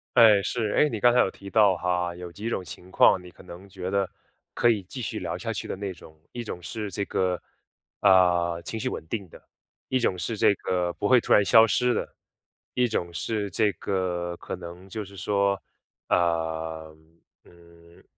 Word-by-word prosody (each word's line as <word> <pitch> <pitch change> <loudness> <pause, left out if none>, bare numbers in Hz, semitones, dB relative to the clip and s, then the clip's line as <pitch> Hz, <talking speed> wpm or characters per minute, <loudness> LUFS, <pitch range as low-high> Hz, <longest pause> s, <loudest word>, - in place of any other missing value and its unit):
哎， 110 -4 +7
是。 110 -4 -1
哎， 150 - +4
你 110 - -4
刚 120 +2 +5
才 125 - +4
有 - - +1
提 100 - -11
到 100 -5 +4
哈， 90 -1 -1
有 90 0 -8
几 105 +6 -5
种 95 - -2
情 90 +2 -11
况 95 - +5
你 90 - -12
可 - - -17
能 90 +2 -11
觉 95 -1 -5
得， 100 -1 0 0.4
可 120 - +3
以 105 -5 +1
继 125 +8 -8
续 110 - -4
聊 - - -4
下 - - -4
去 - - -5
的 - - -2
那 100 -2 -4
种。 80 -2 -16
一 120 -1 -5
种 90 -5 -7
是 105 +1 -5
这 100 +2 -2
个， 90 -2 -1 0.6
呃， 85 -2 +4
情 110 - -4
绪 130 +3 -2
稳 - - -6
定 100 -2 -4
的， - - -14 0.5
一 130 - +1
种 90 -6 0
是 115 +5 -2
这 105 -1 +4
个 90 -2 -1
不 100 - -2
会 125 -2 +5
突 - - -5
然 105 - +7
消 110 +5 +7
失 125 +3 +2
的， - - -3 0.6
一 125 -1 +2
种 85 -5 -2
是 105 +1 -2
这 105 +2 +2
个 90 -1 -2
可 90 - -7
能 90 +2 -10
就 105 +1 -5
是 100 +1 -14
说， 100 -1 0 0.5
呃， 80 -2 -1 0.5
嗯， 85 0 -19
95 Hz, 215 characters per minute, -26 LUFS, 85-105 Hz, 0.6 s, 哎